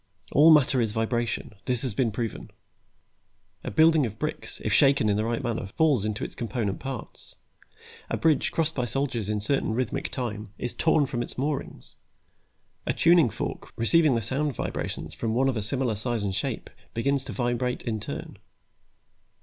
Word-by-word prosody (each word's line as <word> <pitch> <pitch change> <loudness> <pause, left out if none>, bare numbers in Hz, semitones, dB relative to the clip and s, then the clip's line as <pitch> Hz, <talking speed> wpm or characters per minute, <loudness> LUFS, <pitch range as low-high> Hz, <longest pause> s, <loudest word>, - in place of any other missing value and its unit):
All 150 +3 +7
matter 145 -4 +5
is 110 -2 0
vibration; 115 +1 -1
that 125 -2 +1
has 130 -5 +1
been 115 +1 +1
proven. 115 0 -4 1.1
A - - -3
building 160 -1 +5
of 110 0 -9
bricks, - - -4
if - - +1
shaken 135 -6 +4
in 100 - +2
the 105 - 0
right 115 +1 -2
manner, 115 -4 -2
falls 135 0 +2
into 110 -1 -2
its - - -4
component 110 -3 -3
parts; 135 -4 -8 0.7
a - - -1
bridge, 155 -4 +2
crossed 165 -1 0
by 125 -5 -1
soldiers 120 -4 -1
in 105 -1 0
certain 110 0 +1
rhythmic 125 -1 -2
time, 110 -5 -5
is 120 - -3
torn 160 -2 +3
from 120 -2 -3
its - - -5
moorings. 140 +2 -4 0.9
A - - +2
tuning 170 -6 +5
fork, - - -5
receiving 150 +4 +4
the 115 - -1
sound 135 +4 0
vibrations - - -4
from 115 -1 -2
one 135 +2 +3
of 135 - +1
a 110 - -1
similar 125 +2 0
size 115 +1 -2
and 100 -2 -1
shape 95 - -3 0.2
begins 135 +3 +1
to 130 - -6
vibrate 120 +3 -1
in 110 -3 -2
turn. 105 - -7
120 Hz, 175 wpm, -26 LUFS, 110-140 Hz, 1.1 s, All